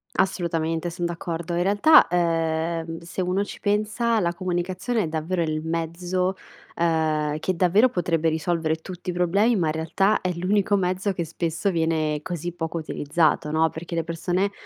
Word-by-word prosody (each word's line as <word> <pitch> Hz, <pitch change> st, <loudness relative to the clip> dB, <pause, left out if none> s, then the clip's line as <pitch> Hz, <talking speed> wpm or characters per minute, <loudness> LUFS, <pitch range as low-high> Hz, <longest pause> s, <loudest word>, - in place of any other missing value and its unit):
Assolutamente 165 Hz, -3 st, 0 dB
son 175 Hz, +1 st, -4 dB
d'accordo. 170 Hz, 0 st, -4 dB
In 175 Hz, -, +1 dB
realtà, 205 Hz, -, +6 dB
ehm, 165 Hz, -1 st, 0 dB
se 170 Hz, +2 st, -5 dB
uno 185 Hz, +2 st, 0 dB
ci -, -, -9 dB
pensa 215 Hz, +3 st, +1 dB
la 170 Hz, -3 st, 0 dB
comunicazione 185 Hz, +5 st, -1 dB
è -, -, -2 dB
davvero 165 Hz, +3 st, -1 dB
il 155 Hz, -1 st, -2 dB
mezzo, 175 Hz, +3 st, -1 dB, 0.4 s
ehm, 155 Hz, -3 st, +1 dB
che 185 Hz, +3 st, -1 dB
davvero 190 Hz, +8 st, +4 dB
potrebbe 165 Hz, -5 st, 0 dB
risolvere 160 Hz, 0 st, 0 dB
tutti 180 Hz, +2 st, -6 dB
i -, -, -6 dB
problemi 195 Hz, +7 st, +2 dB
ma 175 Hz, -6 st, +1 dB
in 155 Hz, -, 0 dB
realtà 170 Hz, +6 st, +1 dB
è 185 Hz, -, -1 dB
l'unico 195 Hz, +4 st, +1 dB
mezzo 185 Hz, +1 st, 0 dB
che 175 Hz, -, -2 dB
spesso 165 Hz, +3 st, -2 dB
viene 160 Hz, -3 st, 0 dB
così 175 Hz, -1 st, -4 dB
poco 165 Hz, -1 st, -4 dB
utilizzato, 155 Hz, 0 st, 0 dB
no, 160 Hz, +1 st, +3 dB
perché 170 Hz, +2 st, -8 dB
le 165 Hz, -, 0 dB
persone 175 Hz, +4 st, -1 dB
170 Hz, 165 wpm, -24 LUFS, 160-185 Hz, 0.4 s, realtà